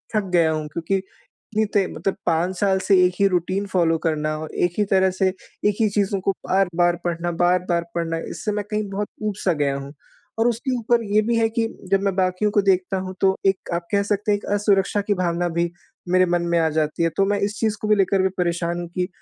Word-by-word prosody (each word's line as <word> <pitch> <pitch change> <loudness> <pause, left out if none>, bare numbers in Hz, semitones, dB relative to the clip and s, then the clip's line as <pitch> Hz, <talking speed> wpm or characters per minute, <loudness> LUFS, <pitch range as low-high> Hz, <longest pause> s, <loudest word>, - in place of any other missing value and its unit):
थक 215 - +2
गया 165 -2 +4
हूँ। 155 -1 -2
क्योंकि 170 +4 -1
इतनी 210 +3 -5
ते 200 -2 +3
मतलब 195 - -2
5 170 +3 +1
साल 195 -2 +2
से 195 - +6
एक 180 - +1
ही 200 - +5
रूटीन 185 +2 0
फ़ॉलो 170 -4 +2
करना 155 -1 0
और 155 0 -7
एक 175 -1 +1
ही - - +4
तरह 190 -1 +4
से 190 - +4
एक 200 +2 -3
ही 215 - +3
चीज़ों 200 -1 0
को 195 - +1 0.2
बार-बार 175 -2 +2
पढ़ना, 175 0 -2
बार-बार 175 0 +1
पढ़ना 165 -1 -1
इससे 210 - -3
मैं 205 -1 -2
कहीं 210 0 0
बहुत 200 +1 -3 0.2
ऊब 210 -2 -1
सा 180 - +4
गया 145 -3 0
हूँ। 140 +1 -8 0.5
और 225 - +4
उसके 240 +3 -1
ऊपर 235 0 +1
ये 215 - +5
भी 230 +2 0
है 225 - +3
कि 225 0 0 0.2
जब 195 0 +3
मैं 195 -2 0
बाकियों 185 +2 +1
को 205 -1 +3
देखता 190 -1 +1
हूँ 185 0 -6
तो 190 0 +4
एक 195 -1 +1
आप 170 0 -2
कह 200 -1 +2
सकते 205 +1 0
हैं 205 - +3
एक 205 - -11
असुरक्षा 205 -1 +2
की 205 +1 0
भावना 175 -2 0
भी 170 0 -1 0.4
मेरे 185 +1 +4
मन 175 -1 +1
में 170 - +3
आ 160 - +3
जाती 155 +1 -1
है। 165 - +3
तो 195 - +4
मैं 205 +1 0
इस 205 +1 -1
चीज़ 220 -1 0
को 215 - -2
भी 210 - +5
लेकर 195 -1 +2
भी 190 - +2
परेशान 175 -1 -1
हूँ 175 - -5
कि 180 -1 0
190 Hz, 240 wpm, -22 LUFS, 170-205 Hz, 0.5 s, से